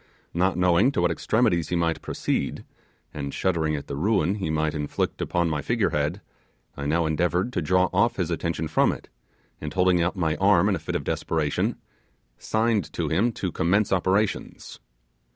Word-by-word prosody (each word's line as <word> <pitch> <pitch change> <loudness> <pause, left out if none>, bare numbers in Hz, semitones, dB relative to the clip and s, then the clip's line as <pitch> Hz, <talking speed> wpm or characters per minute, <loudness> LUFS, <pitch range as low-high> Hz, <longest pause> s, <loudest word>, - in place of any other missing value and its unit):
Not 90 +1 +1
knowing 90 +7 +4
to 125 - 0
what 85 -1 +2
extremities 90 -3 +1
he 90 - 0
might 85 -1 0
proceed, - - -2 0.5
and 70 -2 -4
shuddering 80 -4 0
at 70 - -5
the - - -5
ruin 95 +2 +1
he 95 -5 -3
might 80 0 0
inflict 75 -1 -2
upon 85 -1 0
my 75 -2 -1
figure 115 +2 0
head, 75 +7 -1 0.5
I 70 0 -4
now 80 +3 +1
endeavoured 90 +8 0
to - - 0
draw 90 +3 +3
off 100 +6 +3
his 85 -2 -2
attention 85 -1 -2
from - - +3
it, - - -9 0.5
and 75 - -4
holding 90 -1 +3
out 85 +4 0
my 80 -4 0
arm 95 -1 +4
in 100 - +2
a - - -4
fit - - -5
of - - -1
desperation, 75 -3 -1 0.6
signed 110 -8 0
to - - -2
him 110 +9 +2
to 95 -4 -3
commence 95 +6 +1
operations. 95 +3 -1
85 Hz, 180 wpm, -25 LUFS, 80-95 Hz, 0.6 s, knowing